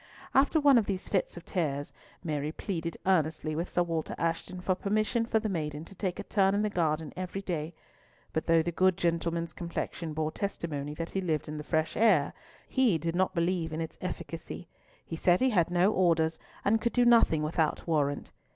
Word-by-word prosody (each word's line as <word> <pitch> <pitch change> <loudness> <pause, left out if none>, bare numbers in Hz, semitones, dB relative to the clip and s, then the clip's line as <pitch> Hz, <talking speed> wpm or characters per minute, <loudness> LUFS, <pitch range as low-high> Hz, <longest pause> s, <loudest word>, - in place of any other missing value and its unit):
After 280 +4 +4
one 285 -4 +6
of 215 - -2
these 190 -2 -3
fits 190 -3 -1
of 170 - -9
tears, 145 -5 -2 0.3
Mary 150 -2 -2
pleaded 170 -2 -4
earnestly 160 -4 +1
with 170 +3 -2
Sir 175 - +2
Walter 165 -2 -3
Ashton 170 +2 -2
for 185 +1 +1
permission 215 +4 0
for 225 - +2
the 220 - -2
maiden 155 -5 -3
to 195 - -12
take 185 -2 -3
a 205 - -4
turn 195 -1 +2
in 205 - +1
the 210 - 0
garden 160 -4 0
every 185 +2 -4
day, 165 -3 -3 0.6
but 160 - -2
though 165 -1 +5
the 175 - -2
good 185 +1 +3
gentleman's 170 -1 -1
complexion 170 -2 -4
bore 155 0 -1
testimony 150 -7 -4
that 165 +1 -5
he 195 - -1
lived 160 -5 -1
in 150 0 -5
the - - -5
fresh 160 0 0
air, 200 -11 +4 0.3
he 250 -10 +3
did 165 +2 -2
not 185 +1 +1
believe 170 -1 0
in 155 - -3
its 160 -1 -5
efficacy; 175 -1 -6 0.4
he 165 - -5
said 175 +2 +3
he 260 0 +3
had 175 -5 +3
no 180 +4 +3
orders, 165 -3 +2 0.3
and 220 +2 +3
could 235 - 0
do 245 -1 +4
nothing 230 -10 +5
without 155 0 0
warrant. 145 -4 0
170 Hz, 200 wpm, -30 LUFS, 160-195 Hz, 0.6 s, one